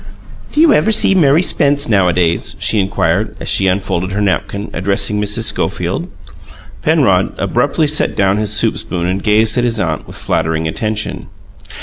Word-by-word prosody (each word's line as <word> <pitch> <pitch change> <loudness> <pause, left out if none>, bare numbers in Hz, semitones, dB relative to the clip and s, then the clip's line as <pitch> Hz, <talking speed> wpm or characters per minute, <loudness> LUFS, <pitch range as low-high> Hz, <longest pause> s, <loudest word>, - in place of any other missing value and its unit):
"Do 295 - -2
you 320 -2 +6
ever 220 - +2
see 210 -2 +4
Mary 160 -2 +3
Spence 145 -4 +1
nowadays?" 90 -5 +1
she 110 - +1
inquired, 95 +1 -1
as - - -7
she 95 - +1
unfolded 95 -1 -1
her 105 - -2
napkin, 100 +1 -2
addressing 100 +2 0
Mrs. 105 +2 -1
Schofield. - - -2 0.7
Penrod - - +2
abruptly 155 - 0
set 150 +1 +1
down 100 0 +1
his 105 -1 -1
soup - - +1
spoon 85 -1 -4
and 95 +2 -2
gazed 110 +3 +2
at - - 0
his 115 -2 -1
aunt 80 -5 -2
with - - -11
flattering 80 0 -1
attention. 105 +6 -4
105 Hz, 160 wpm, -15 LUFS, 95-115 Hz, 0.7 s, you